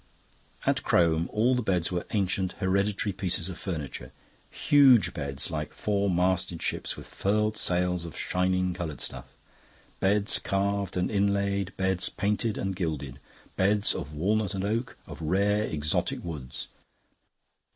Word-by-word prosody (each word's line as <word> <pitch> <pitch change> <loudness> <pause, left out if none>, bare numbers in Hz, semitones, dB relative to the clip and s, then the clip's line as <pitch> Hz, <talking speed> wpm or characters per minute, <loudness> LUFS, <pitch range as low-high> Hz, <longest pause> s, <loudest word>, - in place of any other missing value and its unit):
At - - +2
Crome 85 0 +2
all 115 +4 +3
the 125 - +1
beds 90 -6 0
were 90 -1 -2
ancient 95 -2 0
hereditary 100 +1 0
pieces 90 -2 -1
of 90 - -6
furniture. 75 -9 -5 0.4
Huge 135 -6 +5
beds, 70 -1 -4
like 75 -2 -4
four 100 -1 0
masted 90 -1 +1
ships, - - -1
with - - -9
furled 105 +2 0
sails 90 -4 +1
of 85 - -7
shining 90 0 0
coloured 85 -4 -5
stuff. - - -6 0.6
Beds 105 +1 +3
carved 100 -1 -1
and 90 +3 0
inlaid, 100 -1 0
beds 95 -1 +1
painted 105 +1 -1
and 95 -1 -2
gilded. 75 -6 -3 0.4
Beds 100 +2 +2
of 75 +1 -6
walnut 100 +4 0
and 95 - -2
oak, 115 +5 -2
of - - -9
rare 100 +6 +2
exotic 75 -3 -1
woods. 70 -7 -6
95 Hz, 140 wpm, -28 LUFS, 85-100 Hz, 0.6 s, Huge